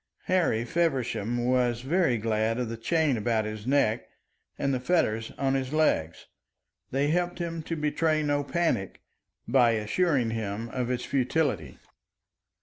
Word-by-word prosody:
Harry 170 -11 +1
Feversham 120 -7 0
was 125 -2 +1
very 155 -2 +2
glad 110 +1 0
of 125 -2 -2
the 115 - -4
chain 145 +3 +1
about 110 0 0
his 110 +1 -6
neck 130 -5 +1 0.5
and 140 - 0
the 130 - 0
fetters 115 -7 +1
on 135 -1 +1
his 135 -1 -1
legs. 85 - +1 0.6
They 140 +2 +1
helped 175 +2 0
him 165 -2 -3
to 165 +2 -4
betray 155 0 +1
no 145 -1 +1
panic, 140 - -1 0.5
by 120 -2 +4
assuring 120 +3 +1
him 110 0 -3
of 125 0 -2
its 125 -1 -2
futility. 130 - 0
125 Hz, 145 wpm, -27 LUFS, 115-155 Hz, 0.6 s, by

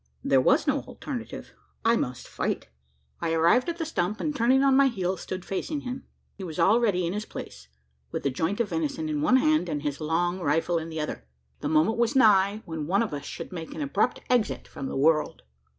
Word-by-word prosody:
There - - +4
was - - +3
no - - +2
alternative 245 -5 -7 0.3
I 230 +1 +5
must 125 - -3
fight! - - -3 0.5
I 165 -1 -1
arrived 170 - +3
at 340 - -3
the 330 - -2
stump; 210 - -2
and 300 -1 -2
turning 260 +2 +3
on 270 -1 +4
my 275 0 +6
heel, 190 -7 -1
stood 185 0 -6
facing 285 +9 -3
him. 255 0 -6 0.3
He 195 - -9
was 160 -4 -6
already 205 -4 +3
in 170 - -2
his 210 +1 -4
place - - -9 0.4
with - - -4
the 140 - +1
joint 165 - -1
of 230 -4 0
venison 160 -2 -2
in 150 -1 -1
one 255 +12 +5
hand, 310 - +2
and 150 -2 -3
his 145 0 -3
long 175 +4 0
rifle 165 +1 +1
in 165 +1 -6
the 160 -1 -5
other. 110 - -5 0.3
The - - -3
moment 160 +9 +2
was 235 +3 +2
nigh, 210 -3 +4
when 160 -3 -5
one 200 +6 +2
of 220 - -4
us 145 - -5
should - - -7
make 165 -3 -7
an - - -5
abrupt 275 -3 0
exit 245 -4 0
from 135 - -6
the - - -4
world! 155 +2 +2
185 Hz, 215 wpm, -27 LUFS, 160-240 Hz, 0.5 s, my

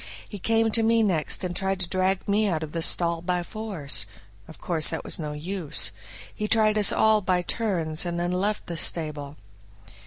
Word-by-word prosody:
He 205 - -9
came 225 +3 +1
to 225 - +3
me 225 0 +2
next 180 -3 0
and 180 -1 -4
tried 190 -1 -1
to 175 - +3
drag 185 +1 -1
me 210 +1 +2
out 160 -5 -1
of 155 - -7
the 165 - -3
stall 170 0 +1
by 180 0 -1
force; 195 -8 0 0.4
of 160 - -13
course 160 -3 +1
that - - -4
was - - -6
no 150 -2 -5
use. 170 +1 0 0.4
He 210 - -4
tried 215 -1 +2
us 205 - +6
all 220 -1 +3
by 180 -2 0
turns 175 -8 -2
and 175 -1 -3
then 175 +1 -1
left 200 +4 -1
the 170 - -5
stable. 150 -3 +1
180 Hz, 195 wpm, -25 LUFS, 165-210 Hz, 0.4 s, us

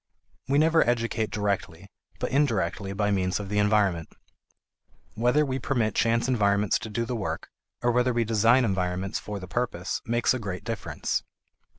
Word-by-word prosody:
We 140 +2 +2
never 160 +2 +5
educate 115 -2 0
directly, 100 -4 -2 0.3
but - - -3
indirectly 115 -7 0
by 105 +1 0
means 95 -1 0
of 100 -2 -6
the 105 0 +1
environment. 100 -6 +2 1.0
Whether 125 +7 +2
we 130 -1 -2
permit 120 -5 0
chance 115 +3 +2
environments 105 -5 +2
to 110 - -7
do 115 +2 -2
the 125 +1 -3
work, 110 - -4 0.3
or 120 - +3
whether 125 +1 +2
we 120 -1 +1
design 115 +3 +4
environments 95 -1 -1
for 105 -1 -6
the 90 - -8
purpose 120 +5 -2
makes 120 +2 +1
a 130 - -2
great 95 -5 -5
difference. - - -2
110 Hz, 165 wpm, -26 LUFS, 100-120 Hz, 1.0 s, never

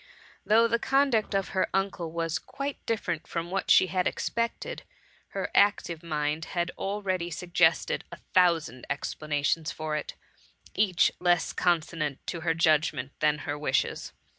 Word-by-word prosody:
Though 225 +2 +5
the 235 0 +1
conduct 270 -7 +2
of 195 -1 0
her 190 - 0
uncle 195 -4 -1
was 165 +1 -1
quite 275 0 -6
different 190 -8 -2
from 170 +1 -4
what 195 0 -2
she - - +7
had 185 0 0
expected, 235 - -2 0.5
her - - -4
active 200 -5 +3
mind 155 -1 -2
had 175 0 0
already 190 -3 -2
suggested 175 +1 +1
a - - -8 0.2
thousand 170 -8 +2
explanations 150 +2 -1
for 155 -1 -3
it, 150 - -4 0.6
each 190 -5 +3
less 175 -2 +2
consonant 165 -4 0
to 170 - -4
her 165 0 +1
judgment 155 -5 +2
than 150 -1 +3
her 145 -1 -3
wishes. 135 -3 -1
170 Hz, 140 wpm, -28 LUFS, 155-195 Hz, 0.6 s, she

